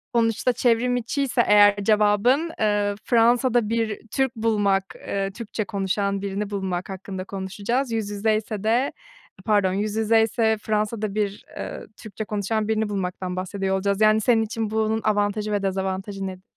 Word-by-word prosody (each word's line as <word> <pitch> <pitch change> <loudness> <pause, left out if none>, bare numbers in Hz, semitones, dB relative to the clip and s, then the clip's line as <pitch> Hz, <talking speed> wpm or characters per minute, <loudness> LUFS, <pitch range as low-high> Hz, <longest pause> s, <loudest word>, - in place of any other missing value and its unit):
sonuçta 230 +2 +2
çevrim 245 +1 +2
içiyse 245 +1 0
eğer 205 -1 +7
cevabın, 215 +9 +3
eee, 205 -1 +1
Fransa'da 240 -1 +3
bir 225 -2 -1
Türk 265 -2 0
bulmak, 205 -4 +1 0.2
eee, 195 0 -1
Türkçe 215 0 -5
konuşan 200 0 -1
birini 200 +1 -3
bulmak 190 -3 -3
hakkında 190 0 -6
konuşacağız. 200 +7 -3
Yüz 220 -3 -2
yüzeyse 215 0 -1
de 235 +5 +2 0.5
pardon, 205 -4 +2
yüz 205 +2 -2
yüzeyse 225 0 +2
Fransa'da 215 -1 -1
bir 205 -1 -2
ııı, - - -6
Türkçe 215 0 -7
konuşan 210 +1 -1
birini 220 -1 0
bulmaktan 185 -2 -3
bahsediyor 190 +1 -2
olacağız, 200 +1 0
yani, 215 0 +5
senin 225 0 +3
için 220 0 -3
bunun 220 0 0
avantajı 210 0 0
ve 205 -1 0
dezavantajı 195 +1 -2
nedir? 185 0 -8
210 Hz, 145 wpm, -24 LUFS, 200-225 Hz, 0.5 s, eğer